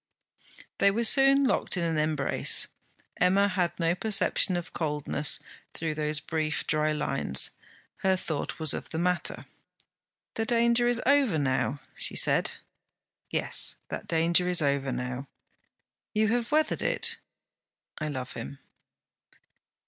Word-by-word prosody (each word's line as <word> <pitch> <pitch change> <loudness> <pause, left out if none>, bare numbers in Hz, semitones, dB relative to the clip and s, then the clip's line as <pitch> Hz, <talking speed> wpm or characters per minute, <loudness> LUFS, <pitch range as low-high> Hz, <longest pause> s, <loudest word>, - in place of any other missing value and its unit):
They 200 - +5
were 225 +4 -1
soon 275 +3 +5
locked 250 - 0
in 175 - -1
an 165 -2 0
embrace. 150 -3 +2 0.5
Emma 195 +3 +3
had 185 -3 -1
no 165 0 +2
perception 195 -2 +2
of 175 - -7
coldness 150 -2 0 0.4
through 160 -1 -2
those 150 0 -2
brief 155 -1 -2
dry 155 0 +1
lines; 135 - 0 0.5
her 190 -1 +1
thought 160 -5 -4
was 155 -3 +3
of - - -6
the 160 - -4
matter. 180 +1 -1 0.9
'The 225 - -2
danger 235 +1 +3
is 240 -1 +1
over 270 - +3
now?' 140 0 -1
she - - -1
said. - - +3 0.8
'Yes, - - -1
that - - -6
danger 170 +2 +3
is 175 -3 +3
over 140 -1 0
now.' 125 +2 -4 0.9
'You 215 0 +2
have 240 +1 -1
weathered 310 +1 +2
it?' - - 0 0.8
'I 155 - -3
love 130 -4 -5
him.' 140 - -7
165 Hz, 135 wpm, -27 LUFS, 150-210 Hz, 0.9 s, They